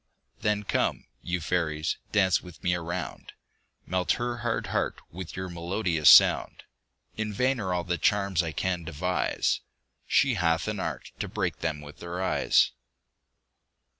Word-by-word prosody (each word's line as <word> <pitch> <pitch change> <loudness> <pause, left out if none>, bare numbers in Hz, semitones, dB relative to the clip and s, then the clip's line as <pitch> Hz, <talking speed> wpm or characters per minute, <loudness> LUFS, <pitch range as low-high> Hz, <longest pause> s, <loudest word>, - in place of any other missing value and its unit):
Then 105 0 0
come, - - 0 0.2
you 90 0 -2
fairies, 80 -2 -1
dance 95 -3 +3
with 90 -3 -13
me 90 - +2
a 90 - -2
round; 85 -2 -5 0.5
Melt 90 0 +1
her 120 0 -2
hard 120 -1 -2
heart - - 0
with 90 0 -7
your 95 0 -3
melodious 85 -2 +2
sound. - - +6 0.5
In 110 -1 -2
vain 125 +5 +1
are 95 -4 -2
all 90 -1 0
the 85 -2 -2
charms 100 -3 +2
I 80 -2 -3
can 90 +1 -2
devise; 85 +3 0 0.5
She - - +3
hath 85 +1 +1
an 105 -2 -2
art - - -4
to - - -2
break - - -2
them 75 -1 -2
with 75 0 -12
her 85 +1 -5
eyes. 95 - +3
90 Hz, 155 wpm, -27 LUFS, 85-100 Hz, 0.5 s, sound